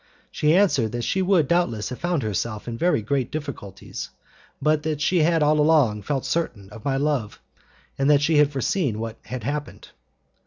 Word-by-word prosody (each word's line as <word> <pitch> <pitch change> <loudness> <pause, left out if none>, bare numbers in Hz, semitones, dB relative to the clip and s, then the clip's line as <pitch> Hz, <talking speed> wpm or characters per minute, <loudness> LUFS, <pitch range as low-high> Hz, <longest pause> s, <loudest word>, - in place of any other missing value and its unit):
She 150 +2 +2
answered 140 - +2
that 120 0 -3
she 190 - 0
would 180 -6 +3
doubtless 120 -12 0
have 125 - -7
found 175 -6 -1
herself 110 +1 -3
in 120 - -4
very 145 -4 +1
great 130 +2 -1
difficulties, 140 - -7 0.5
but 155 0 +2
that 155 -2 -2
she 175 +4 +2
had 165 0 +3
all 150 +1 +3
along 150 -9 +3
felt 135 +6 -2
certain 110 -13 -3
of 105 +1 -11
my 135 -1 0
love, 140 -7 -1 0.6
and 135 +1 +2
that 145 -1 +5
she 160 0 +3
had 150 -1 +4
foreseen 135 - -1
what 115 0 -5
had 125 -2 -6
happened. 145 +4 -5
145 Hz, 185 wpm, -23 LUFS, 115-155 Hz, 0.6 s, that